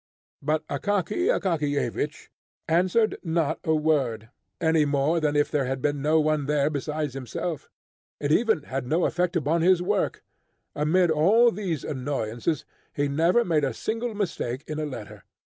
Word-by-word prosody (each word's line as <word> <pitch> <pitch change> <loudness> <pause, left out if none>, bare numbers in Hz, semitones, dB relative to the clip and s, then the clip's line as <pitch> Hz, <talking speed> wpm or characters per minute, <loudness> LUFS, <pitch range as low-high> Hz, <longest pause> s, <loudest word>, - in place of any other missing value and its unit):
But 155 0 0
Akaky 205 - -1
Akakiyevich 150 - -1 0.4
answered 185 +7 +2
not 165 -3 0
a 160 - +2
word, 135 -8 0 0.3
any 160 -2 +3
more 145 +3 +1
than 150 -2 0
if 145 0 +2
there 145 -3 +1
had 135 +1 -2
been 145 +1 -1
no 155 +3 +3
one 155 -2 +1
there 150 0 +2
besides 150 -1 -3
himself. 135 +5 -5 0.5
It 145 0 -1
even 220 -3 +3
had 135 -3 -4
no 165 +6 +2
effect 180 0 0
upon 165 +1 +1
his 180 +1 +5
work. 195 +2 -1 0.5
Amid 165 +4 +2
all 210 +10 +5
these 185 -8 -3
annoyances 130 0 -2 0.3
he 145 0 +1
never 165 +11 +2
made 160 -4 +1
a 130 -4 -1
single 225 - -3
mistake 150 - -3
in 155 0 -5
a 155 - -2
letter. 115 -7 -8
155 Hz, 155 wpm, -26 LUFS, 145-175 Hz, 0.5 s, his